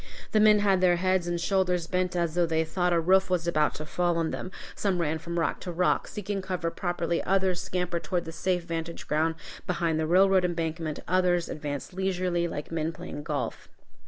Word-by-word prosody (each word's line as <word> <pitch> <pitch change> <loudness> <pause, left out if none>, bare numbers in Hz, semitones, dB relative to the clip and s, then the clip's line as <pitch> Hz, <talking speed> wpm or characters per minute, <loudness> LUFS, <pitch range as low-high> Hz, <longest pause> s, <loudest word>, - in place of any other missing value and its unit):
The 215 - +4
men 215 0 +7
had 195 -2 +3
their 180 -1 +5
heads 185 0 +1
and 175 0 -1
shoulders 180 -1 +1
bent 180 +1 -1
as 170 -2 0
though 175 0 +2
they 160 0 +1
thought 180 +2 0
a 170 - +3
roof 190 +4 +3
was 175 -2 0
about 155 -3 +2
to 155 - -6
fall 175 +2 0
on 165 -1 0
them; - - -4 0.2
some 190 -3 0
ran 160 -1 0
from 170 +2 -5
rock 165 - 0
to 180 - -5
rock, 175 +1 +1
seeking 205 -1 -4
cover 180 -3 -2
properly; 175 -2 -1
others 190 -2 +1
scampered 180 -2 -2
toward 175 -2 -1
the 165 - -6
safe 180 +2 -1
vantage 165 0 -5
ground 160 +2 +1 0.3
behind 170 -3 0
the 160 - 0
railroad 190 +2 +5
embankment; 165 -3 -2
others 180 -1 +2
advanced 145 +2 -5
leisurely, 180 -2 0
like 150 -2 -6
men 160 0 -1
playing 165 -3 -7
golf. 145 - -4
175 Hz, 200 wpm, -28 LUFS, 165-185 Hz, 0.3 s, men